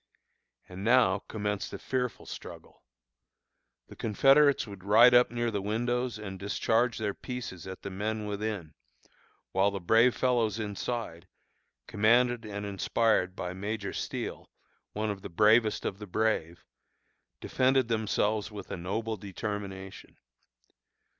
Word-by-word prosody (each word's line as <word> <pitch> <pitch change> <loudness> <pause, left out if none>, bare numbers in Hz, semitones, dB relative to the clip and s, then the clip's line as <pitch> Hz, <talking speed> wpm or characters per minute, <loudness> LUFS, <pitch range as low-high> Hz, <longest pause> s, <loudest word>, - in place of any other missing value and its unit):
And 95 +1 -8
now 115 -4 +4
commenced 105 -2 -3
a - - -4
fearful 125 -2 -3
struggle. - - -10 1.1
The - - -12
Confederates 135 +6 +4
would 100 -4 -11
ride 115 +5 +7
up 125 0 +6
near 120 -1 -1
the 100 -2 -2
windows 120 +3 -1
and 95 -3 -7
discharge 115 +4 +1
their 105 -3 -2
pieces 120 -10 -7
at 95 0 -8
the 100 - -5
men 105 +3 -3
within, 105 -6 -4 0.8
while 95 +2 +3
the 100 -1 -4
brave 115 +7 +4
fellows 120 -4 +1
inside, 105 -4 -4 0.6
commanded 120 +2 +2
and 105 -1 -5
inspired 100 -1 +1
by 90 -1 -4
Major 100 +1 -4
Steele, - - -5 0.4
one 105 0 -1
of 100 -1 -7
the - - -7
bravest 110 +4 +3
of 95 - -3
the 105 - -8
brave, 90 -6 -1 0.7
defended 130 -1 +2
themselves 110 -1 0
with 105 -2 -9
a - - -3
noble 110 +5 -3
determination. 100 -1 -6
105 Hz, 130 wpm, -29 LUFS, 100-115 Hz, 1.1 s, ride